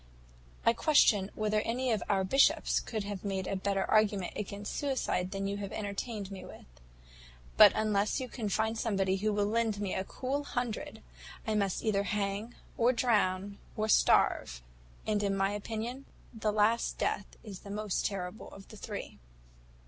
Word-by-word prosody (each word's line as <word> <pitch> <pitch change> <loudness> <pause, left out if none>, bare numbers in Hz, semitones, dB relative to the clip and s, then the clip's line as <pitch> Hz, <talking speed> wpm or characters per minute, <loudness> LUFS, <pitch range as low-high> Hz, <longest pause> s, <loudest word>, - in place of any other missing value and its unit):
I 230 - +6
question 220 -8 +4
whether 215 0 +1
any 250 +3 -1
of 215 -4 +1
our 195 -2 +2
bishops 270 +9 +3
could 215 -3 -4 0.2
make 195 -2 -2
a 195 - -2
better 195 0 0
argument 205 -4 +2
against 205 0 -5
suicide 260 -10 -1
than 195 0 -3
you 200 +1 -2
have 200 -1 -5
entertained 205 0 -4
me 190 -2 -7
with; 185 - -12 0.9
but - - +9
unless 210 -1 +1
you 260 - -4
can 225 -4 -4
find 220 +3 0
somebody 195 -4 0
who 215 +2 0
will 205 0 +1
lend 220 -1 0
me 200 -2 -2
a 190 - -1
cool 270 +8 -3
hundred, 245 -5 -4 0.4
I 220 - 0
must 200 -3 0
either 210 -3 +2
hang, 205 +2 -2 0.2
or 240 +2 +5
drown, 200 -5 +1 0.2
or 215 0 0
starve; 60 - +3 0.4
and, 210 -1 +1
in 200 -1 0
my 195 0 +2
opinion, 225 +5 -4 0.3
the 220 -2 -1
last 215 +2 +2
death - - -1 0.2
is 200 -4 -8
the 200 - -12
most 210 -1 -2
terrible 195 0 -4
of 195 - -13
the 215 - -11
three.' - - -7
210 Hz, 165 wpm, -31 LUFS, 195-225 Hz, 0.9 s, but